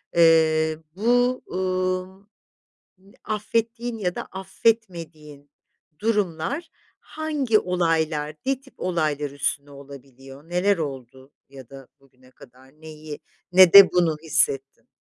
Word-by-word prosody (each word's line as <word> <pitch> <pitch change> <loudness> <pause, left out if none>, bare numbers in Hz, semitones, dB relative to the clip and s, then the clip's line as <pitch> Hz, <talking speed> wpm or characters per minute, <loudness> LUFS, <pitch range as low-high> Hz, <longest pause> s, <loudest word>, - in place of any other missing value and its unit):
Eee, 160 -1 +4 0.2
bu, 245 +4 +1
ımm, 185 +1 -3 1.0
affettiğin 230 +2 -3
ya 180 -3 -2
da - - -4
affetmediğin 170 -8 -3 0.5
durumlar 210 - -2 0.3
hangi 295 -8 -1
olaylar, 160 -4 -1
ne 270 -1 0
tip 270 0 -21
olaylar 155 -5 -1
üstüne 145 0 -3
olabiliyor? 140 +1 -14
Neler 185 +3 +1
oldu 135 -2 -7 0.2
ya 135 -3 -13
da 135 -2 -13
bugüne 130 -1 -24
kadar 130 +4 -19
neyi 155 -1 -9 0.3
nede 185 +1 +8
bunu 170 -3 +2
hissettin? 135 -6 0
165 Hz, 100 wpm, -23 LUFS, 145-200 Hz, 1.0 s, nede